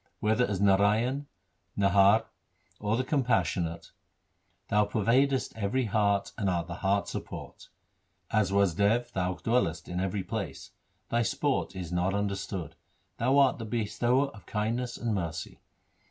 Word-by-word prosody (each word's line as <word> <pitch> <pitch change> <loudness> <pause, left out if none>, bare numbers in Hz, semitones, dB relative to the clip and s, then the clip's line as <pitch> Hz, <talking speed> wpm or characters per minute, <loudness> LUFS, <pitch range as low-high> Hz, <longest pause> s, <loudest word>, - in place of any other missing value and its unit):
Whether 110 +4 +2
as 100 -3 -2
Narayan, 105 +8 +2 0.5
Narhar, 100 +2 +5 0.5
or 105 +2 0
the 130 - +1
Compassionate, 95 - 0 0.8
Thou 105 -1 +4
pervadest 125 +6 +1
every 110 +4 0
heart 100 -2 +1
and 100 -3 +1
art 85 -2 0
the 85 - -6
heart's 100 0 0
support. - - -8 0.6
As 110 -3 +2
Wasdev 100 +5 +2
Thou 90 -2 -1
dwellest 85 -8 0
in 90 0 -3
every 95 +1 -1
place. 110 -3 -5 0.4
Thy 120 - +2
sport 135 0 -1
is 90 -3 -5
not 90 +2 0
understood. 100 -4 -3 0.4
Thou 130 +4 +2
art 135 -3 +4
the 115 - -5
Bestower 120 +4 +1
of 110 -6 -15
kindness 115 +3 -2
and 115 -2 -1
mercy. 85 -5 -4
105 Hz, 135 wpm, -29 LUFS, 95-120 Hz, 0.8 s, Narhar